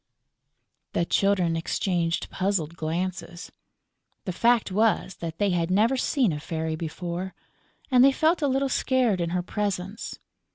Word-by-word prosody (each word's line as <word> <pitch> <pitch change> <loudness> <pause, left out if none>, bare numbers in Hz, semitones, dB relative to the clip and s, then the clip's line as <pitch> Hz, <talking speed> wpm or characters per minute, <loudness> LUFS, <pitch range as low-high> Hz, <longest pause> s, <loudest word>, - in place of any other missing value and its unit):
The 170 - +1
Children 185 -3 +2
exchanged 170 0 -1
puzzled 185 -4 -1
glances. 175 +2 -4 0.7
The 185 - -2
fact 235 +1 +2
was 210 -2 +1
that 165 -1 -6
they 200 0 +1
had 170 -1 0
never 215 +7 +3
seen 255 - +1
a 150 - -4
fairy 160 0 -3
before; 175 +3 -5 0.6
and 250 -1 +6
they 275 - +7
felt 315 +5 +2
a 290 - +2
little 270 +1 +1
scared 250 -7 +1
in 170 - -1
her 180 +1 -1
presence. 200 +1 -3
185 Hz, 140 wpm, -26 LUFS, 170-225 Hz, 0.7 s, they